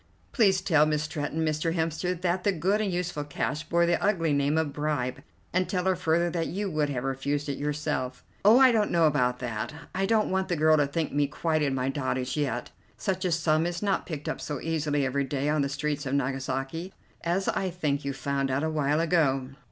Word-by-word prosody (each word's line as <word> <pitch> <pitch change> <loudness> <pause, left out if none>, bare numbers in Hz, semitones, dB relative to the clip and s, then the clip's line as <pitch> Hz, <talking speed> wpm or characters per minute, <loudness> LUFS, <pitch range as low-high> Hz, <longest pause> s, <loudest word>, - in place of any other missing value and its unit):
"Please 195 -6 +3
tell 155 -3 +4
Miss 150 -1 0
Stretton, 155 +1 -2
Mr. 155 +2 0
Hemster, 165 +2 -1
that 180 0 0
the 200 - +3
good 190 +5 +1
and 205 -3 0
useful 175 -4 -2
cash 145 +1 -2
bore 170 0 +3
the 170 0 +1
ugly 170 -7 +2
name 140 +2 +2
of 155 -3 0
bribe, 145 -4 -2 0.3
and 185 +1 +1
tell 180 -2 0
her 190 -1 +3
further 170 +2 +1
that 165 -1 -1
you 195 +2 -3
would 150 -2 0
have 125 -3 -2
refused 140 +2 -2
it 140 -1 -3
yourself." 150 -3 -2 0.2
"Oh, 215 +4 +7
I 260 -1 +7
don't 215 -3 +2
know 170 -1 +3
about 125 -5 +2
that. 120 0 -3 0.2
I 195 +1 0
don't 215 -2 +2
want 190 0 0
the 175 - 0
girl 155 0 +5
to 145 -1 +3
think 155 +2 -2
me 145 0 +2
quite 155 +2 -1
in 140 -2 +1
my 130 0 0
dotage 130 -2 -2
yet. 145 -3 -2 0.3
Such 190 -2 -2
a 180 - +1
sum 165 0 +2
is 175 +3 -4
not 200 -2 0
picked 150 -4 -5
up - - -3
so 145 -2 -4
easily 150 -3 0
every 140 +1 0
day 140 +1 -2
on 150 0 +2
the 140 - 0
streets 145 0 -2
of 135 - 0
Nagasaki, 135 +5 -2 0.3
as 175 +3 0
I 190 - 0
think 150 -5 -1
you 140 - -2
found 140 0 -1
out 135 +3 0
a 160 - 0
while 150 0 +1
ago." 150 -6 +2
155 Hz, 220 wpm, -27 LUFS, 140-175 Hz, 0.3 s, Oh